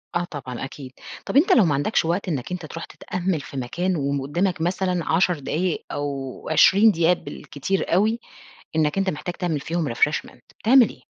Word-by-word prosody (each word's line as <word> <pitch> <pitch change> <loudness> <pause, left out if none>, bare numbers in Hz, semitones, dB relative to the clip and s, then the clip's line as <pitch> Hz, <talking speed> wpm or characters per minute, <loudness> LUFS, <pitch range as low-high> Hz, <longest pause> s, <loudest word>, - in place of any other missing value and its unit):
آه 175 - +1
طبعًا 130 -7 -6
أكيد. 135 -1 -9 0.3
طَب - - 0
أنت 355 +8 +5
لو 225 - +6
ما 155 - +2
عَندكش 145 +7 +1
وقت 175 +5 -1
إنّك 145 -3 -3
أنت 180 -2 -4
ترُوح 165 +2 -7
تتأمّل 180 -3 -3
في 135 - -9
مكان 175 +9 -1
وم 140 -1 -1
قدّامك 175 +6 -1
مثلًا 180 +1 0
10 175 -1 +2
دقايق 165 +5 -2
أو 140 -3 -4
20 200 +7 +6
دقيقة 170 -1 +3
بالكتير 180 +2 -3
أوي، 215 +6 +3 0.6
إنك 155 +3 +1
أنت 195 -1 +1
محتاج 175 +3 -5
تعمل 170 -6 -2
فيهم 160 -4 -2
refreshment 150 +5 0 0.2
بتعمل 245 +1 +6
إيه؟ - - -13
170 Hz, 180 wpm, -23 LUFS, 145-185 Hz, 0.6 s, لو